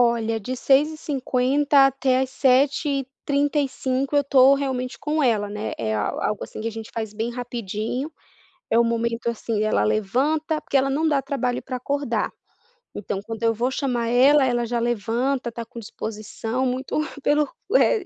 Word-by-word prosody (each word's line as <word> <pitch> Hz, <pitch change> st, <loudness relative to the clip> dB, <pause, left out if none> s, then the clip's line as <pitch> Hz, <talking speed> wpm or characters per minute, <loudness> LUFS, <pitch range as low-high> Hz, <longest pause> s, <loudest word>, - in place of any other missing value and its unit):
Olha, 230 Hz, -2 st, +2 dB
de 250 Hz, +5 st, -4 dB
6h50 280 Hz, -1 st, +2 dB
até 265 Hz, -1 st, +1 dB
às 265 Hz, -1 st, -1 dB
7h35 275 Hz, 0 st, 0 dB
eu 285 Hz, -, +5 dB
tô, 270 Hz, 0 st, +6 dB
realmente 260 Hz, -2 st, -2 dB
com 305 Hz, +1 st, -1 dB
ela, 215 Hz, -5 st, +2 dB
né, 210 Hz, +1 st, -4 dB
é 110 Hz, -1 st, -2 dB
al 105 Hz, -1 st, -2 dB
algo 210 Hz, -, -1 dB
assim -, -, -9 dB
que 225 Hz, -, -2 dB
a -, -, -4 dB
gente 225 Hz, 0 st, -8 dB
faz 220 Hz, -2 st, -3 dB
bem 225 Hz, +3 st, -3 dB
rapidinho, 240 Hz, +2 st, -4 dB, 0.6 s
é 230 Hz, -, +4 dB
o 235 Hz, -, +5 dB
momento 230 Hz, 0 st, -1 dB
assim, 225 Hz, -2 st, -2 dB
ela 215 Hz, -, +2 dB
levanta 285 Hz, +10 st, 0 dB
porque -, -, -1 dB
ela 270 Hz, 0 st, +3 dB
não 310 Hz, +4 st, +1 dB
dá 290 Hz, -3 st, +2 dB
trabalho 260 Hz, -2 st, -2 dB
pra 255 Hz, -, -4 dB
acordar, 280 Hz, +3 st, -1 dB, 0.7 s
então, 195 Hz, -, -3 dB
quando 225 Hz, +1 st, -7 dB
eu 230 Hz, -, +3 dB
vou 240 Hz, +3 st, 0 dB
chamar 250 Hz, -4 st, -1 dB
ela, 265 Hz, +4 st, +5 dB
ela 240 Hz, -2 st, +1 dB
já 235 Hz, 0 st, -1 dB
levanta, 240 Hz, +3 st, -1 dB
tá 235 Hz, +1 st, -6 dB
com 235 Hz, 0 st, -10 dB
disposição, 220 Hz, +3 st, -4 dB
muito 255 Hz, +2 st, -2 dB, 0.3 s
pelo 295 Hz, +1 st, +3 dB, 0.3 s
o -, -, 0 dB
é 420 Hz, -6 st, +3 dB
250 Hz, 170 wpm, -23 LUFS, 230-275 Hz, 0.7 s, tô